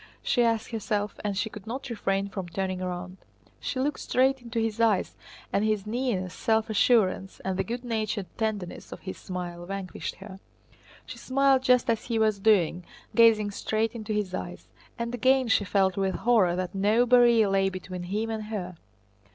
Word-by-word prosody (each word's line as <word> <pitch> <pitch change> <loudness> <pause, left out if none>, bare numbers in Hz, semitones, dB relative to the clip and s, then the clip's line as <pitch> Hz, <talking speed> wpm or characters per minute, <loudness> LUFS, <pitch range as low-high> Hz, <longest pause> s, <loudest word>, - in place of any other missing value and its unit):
she 245 - +2
asked 230 -1 0
herself, 210 -2 -2
and 205 -2 -2
she 220 - 0
could 210 -1 -10
not 260 +5 -5
refrain 195 -4 -1
from 190 -2 -6
turning 185 +1 -2
round. 180 0 -5 0.4
She 260 - -3
looked 285 +2 -1
straight 265 +1 +2
into 235 -1 -4
his 225 0 -1
eyes, 220 -4 +2 0.4
and 200 - +2
his 215 -2 0
nearness, 210 -6 -2
self 220 0 0
assurance, 195 -4 +2
and 190 -1 -2
the 190 - 0
good 240 +5 -5
natured 215 -4 -2
tenderness 215 -5 -3
of - - -8
his 190 - -7
smile 175 -2 -6
vanquished 195 -1 -5
her. 195 -1 -11 0.7
She - - -9
smiled 270 0 +3
just 250 -1 +3
as 225 -2 0
he 230 -2 -1
was 215 -2 +2
doing, 190 -4 +3 0.3
gazing 220 -3 +5
straight 220 +3 -1
into 220 -2 -6
his 210 -3 -1
eyes. - - -6 0.3
And 235 0 -3
again 260 +1 +3
she 205 - +3
felt 190 -1 +1
with 195 -1 0
horror 215 -8 +3
that 185 -1 -3
no 210 +5 +3
barrier 240 -3 +5
lay 195 0 +2
between 185 -1 -7
him 210 +5 -2
and 220 -1 -4
her. 185 -5 -5
215 Hz, 180 wpm, -27 LUFS, 190-230 Hz, 0.7 s, gazing